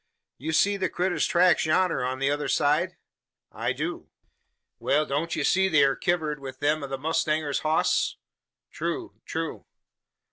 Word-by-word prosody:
You 155 +5 -3
see 200 +5 +3
the 190 - -1
critter's 180 0 0
tracks 180 0 +4
yonner 165 -3 +2
on 130 +1 -2
t'other 145 +1 0
side?" 150 +6 +1 0.5
"I - - -2
do." - - -4 0.7
"Wal 150 +2 +2
don't 150 +4 -2
ye 150 - -1
see 190 +5 +3
they 155 -5 +5
air 135 -1 +3
kivered 160 -5 -1
wi' 135 -1 -7
them 150 +2 +1
o' - - -4
the 135 0 -4
mowstanger's 155 -1 0
hoss?" 155 +1 +1 0.5
"True - - -4
true." - - -4
155 Hz, 150 wpm, -26 LUFS, 140-175 Hz, 0.7 s, they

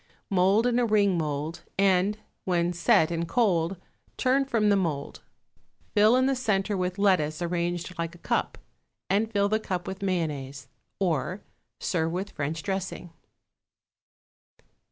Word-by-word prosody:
Mould 195 +4 +3
in 245 0 +2
a 245 - +3
ring 205 -3 +3
mould, 155 0 -3 0.2
and, 195 +1 +3 0.3
when 175 -1 +1
set 170 -1 +3
and 170 0 -2
cold, 185 -4 +1 0.4
turn 270 +1 +2
from 225 -5 +2
the 200 - +5
mould; 160 -7 -2 0.7
fill 215 +2 +5
in 260 0 +3
the 270 - +2
centre 210 -4 0
with 180 0 -2
lettuce 180 -7 +2
arranged 175 0 -2
like 170 0 -3
a - - -13
cup, - - -1 0.5
and 215 +3 +1
fill 200 -2 +2
the 215 +1 +1
cup 180 -5 -3
with 190 +1 -6
mayonnaise. 145 -8 -2 0.3
Or, 180 +1 -1 0.4
serve 165 -2 0
with 190 +3 -3
French 155 +2 -3
dressing. 190 -3 -4
185 Hz, 140 wpm, -27 LUFS, 170-205 Hz, 0.7 s, the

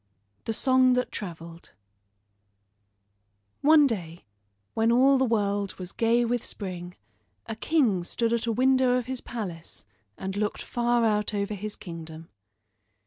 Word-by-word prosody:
THE 225 - -1
SONG 255 0 +4
THAT 250 0 0
TRAVELED 170 -4 -8 1.9
One 300 0 +6
day 175 -9 -4 0.5
when 225 +1 +2
all 265 +3 +5
the 265 - +3
world 205 -4 0
was 185 0 -8
gay 235 +1 +2
with 240 0 -1
spring 180 -3 -7 0.5
a 225 - -5
king 225 - +1
stood 230 +6 -1
at 235 0 -1
a - - +2
window 255 +1 +3
of 250 - -2
his 260 0 -4
palace 180 - -7 0.3
and 190 0 -5
looked 210 0 -2
far 240 -1 +1
out 210 -1 +1
over 200 +1 -2
his 210 +1 -5
kingdom. 165 -4 -9
225 Hz, 140 wpm, -27 LUFS, 190-245 Hz, 1.9 s, One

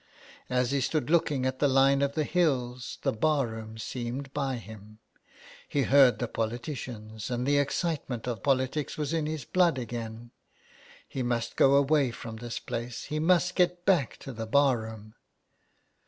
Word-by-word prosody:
As 125 0 +1
he 140 -1 +1
stood 155 +3 -1
looking 150 -6 +2
at 130 0 -1
the 145 - +4
line 135 +1 +4
of 140 0 +1
the 155 - 0
hills 130 -8 0
the - - +2
bar 145 +4 +2
room 110 -1 -7
seemed 125 +4 -5
by 135 -3 -1
him. 110 -2 -11 0.7
He 140 - +1
heard 135 -2 +6
the 120 - -2
politi 115 +6 -3
cians, 110 -4 -7
and 125 0 -1
the 145 +1 +3
excitement 145 -4 -2
of 120 -5 -3
politics 135 +2 0
was 150 0 -2
in 160 -2 0
his 155 -5 -4
blood 175 -6 +3
again. 115 -1 -6 0.8
He 135 - -4
must 120 -1 -1
go 135 +1 +5
away 140 -1 +3
from 115 -1 -8
this 120 0 -5
place 120 0 -5
— - - -8
he 155 - 0
must 180 +2 +3
get 180 -1 +1
back 170 -10 +2
to 135 - -7
the 115 -1 -5
bar 135 0 +4
room. 110 -1 -9
130 Hz, 175 wpm, -28 LUFS, 115-145 Hz, 0.8 s, heard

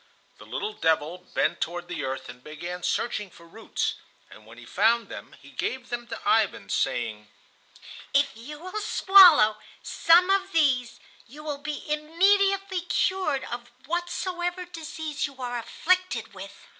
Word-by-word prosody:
The - - -13
little 435 -3 -4
devil 160 - 0
bent 175 -2 -1
toward 175 +1 -3
the - - -5
earth 130 0 -4
and 125 +1 -12
began 170 +4 -7
searching 210 0 -1
for 170 - -17
roots, - - -3 0.3
and 110 0 -15
when 115 +1 -14
he 120 - -12
found 225 - +2
them - - -9
he - - -16
gave 255 -1 -4
them 240 0 -4
to - - -6
Ivan, 420 - +2
saying: 110 -3 -1 0.8
"If 280 -2 +2
you 265 +7 -9
will 370 +6 -6
swallow 355 - +7 0.3
some 350 +3 +4
of 390 0 +1
these 265 -7 +2 0.3
you 295 +5 -12
will 295 -2 -4
be 295 +1 -5
immediately 380 +5 +2
cured 355 -5 0
of 240 0 -7 0.2
whatsoever 350 +2 -3
disease 315 -3 -5
you 275 -1 -15
are 245 -1 -3
afflicted 245 - -1
with." 195 +1 -11
280 Hz, 150 wpm, -26 LUFS, -, 0.8 s, swallow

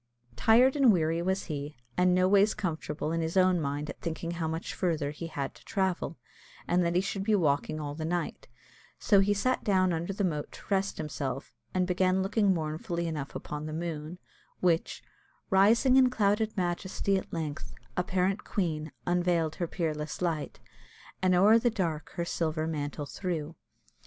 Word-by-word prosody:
Tired 235 - +5
and 270 -5 +6
weary 165 -2 +1
was 190 +2 0
he, 145 -3 -5 0.2
and 180 0 +4
noways 195 +3 +4
comfortable 160 -5 -3
in 165 0 0
his 160 +3 -2
own 185 -2 +4
mind 145 +1 -2
at - - -8
thinking 165 0 -3
how 170 -2 -2
much 160 +2 -4
farther 160 -6 -1
he 165 +3 -6
had 140 -4 -4
to - - -18
travel, 190 -4 -1 0.5
and 180 +1 +3
that 170 0 0
he 180 - +4
should 195 0 -3
be 215 +1 +3
walking 155 -3 +1
all 145 -1 -4
the 155 +2 -5
night; 170 +1 -3 0.5
so 200 - +4
he 195 +1 +3
sat 255 +6 +1
down 185 -3 +3
under 165 +3 -2
the 200 +1 -2
moat 150 -5 -2
to - - -12
rest 195 0 +1
himself, 140 -3 -4 0.2
and 185 -1 +1
began 185 +1 +2
looking 200 0 +2
mournfully 170 +2 -2
enough 150 -4 -4
upon 150 +1 -5
the 155 - -5
moon, 160 0 -4 0.4
which 170 -2 +1 0.5
"Rising 225 +7 +5
in 260 -1 +6
clouded 215 -2 +1
majesty, 185 +2 -1
at 190 - -3
length 155 -3 -5 0.2
Apparent 185 +2 0
Queen, 155 -5 -2
unveil'd 175 -3 +1
her 175 - -1
peerless 155 -3 -3
light, 165 -4 -2 0.6
And 185 -1 +3
o'er 210 +5 +6
the 240 - +2
dark 170 -8 -3
her 170 - -1
silver 160 -2 -1
mantle 145 -2 -3
threw." 165 -1 -4
175 Hz, 170 wpm, -29 LUFS, 155-190 Hz, 0.6 s, and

